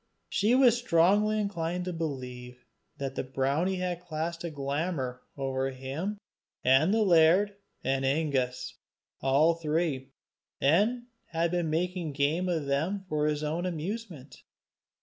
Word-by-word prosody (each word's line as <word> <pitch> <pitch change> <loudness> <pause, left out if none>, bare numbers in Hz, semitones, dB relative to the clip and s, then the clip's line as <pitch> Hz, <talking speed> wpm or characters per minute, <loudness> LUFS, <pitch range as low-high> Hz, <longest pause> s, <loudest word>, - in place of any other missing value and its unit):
She 215 +5 +3
was 255 -3 +6
strongly 210 +1 +3
inclined 180 -3 -2
to 180 - -3
believe 125 -6 -6 0.3
that 135 -1 -3
the - - -2
brownie 140 +8 0
had 180 -1 -3
cast 165 +1 -3
a 170 - -2
glamour 140 -3 -3 0.2
over 135 -1 -1
him 135 +10 -4 0.5
and 135 +8 +5
the 220 0 +3
laird 180 +3 +5 0.3
and 135 +1 0
Angus, 135 -3 -1 0.4
all 140 +5 +4
three, 155 -4 -1 0.5
and 210 - +3 0.2
had 165 0 0
been 175 -2 0
making 170 -1 -1
game 155 +6 +1
of 160 -4 -1
them 165 +8 -1
for 150 0 +1
his 150 0 -1
own 165 +4 -1
amusement. 170 - -6
160 Hz, 130 wpm, -29 LUFS, 135-180 Hz, 0.5 s, was